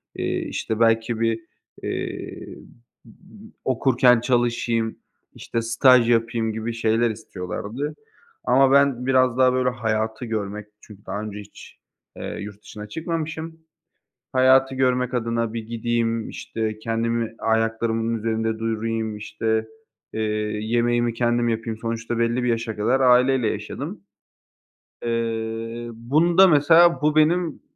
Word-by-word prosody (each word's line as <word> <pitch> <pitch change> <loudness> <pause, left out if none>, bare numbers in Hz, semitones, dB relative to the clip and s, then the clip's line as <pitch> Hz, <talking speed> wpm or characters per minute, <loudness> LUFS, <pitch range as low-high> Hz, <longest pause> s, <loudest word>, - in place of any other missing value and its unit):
eee, - - -2
işte, 110 0 -3
belki 115 0 +2
bir, 115 -1 +1 0.4
eee, - - -5 0.5
m 110 - -15 0.3
m 220 - -14
okurken 125 -1 +4
çalışayım, 120 -2 0 0.4
işte, 115 - -3
staj 120 +1 +4
yapayım 115 -1 +1
gibi 110 +1 -4
şeyler 115 +1 +1
istiyorlardı, 110 +6 -5 0.5
ama 135 0 +4
ben 140 -3 +3
biraz 130 -2 +3
daha 130 -1 +4
böyle 130 0 +2
hayatı 110 0 -2
görmek 105 -2 -4
çünkü 105 -2 -15
daha 105 - -4
önce 105 -1 -6
hiç, 100 - -13 0.4
eee, - - -5
yurt 105 0 -8
dışına 105 0 -9
çıkmamışım, 160 +1 -4 0.7
hayatı 130 +1 +4
görmek 125 -1 +1
adına 115 -1 -1
bir 115 -1 -4
gideyim, 115 0 -1
işte, 110 -1 -4
kendimi 115 0 -2
ayaklarımın 115 0 0
üzerinde 110 0 -1
durayım, 115 -1 -2
işte, 110 +1 -2 0.5
eee, 110 - -4 0.4
yemeğimi 120 +1 +1
kendim 120 0 +1
yapayım. 115 -1 -2
Sonuçta 115 0 -3
belli 120 +2 +1
bir 125 - 0
yaşa 115 -2 -1
kadar 120 +6 +1
aileyle 125 -1 +4
yaşadım. - - -5 1.0
Eee, 115 0 -3
bunda 165 +11 +4
mesela 160 0 +5
bu 150 0 +2
benim 165 +1 +2
115 Hz, 125 wpm, -23 LUFS, 110-125 Hz, 1.0 s, mesela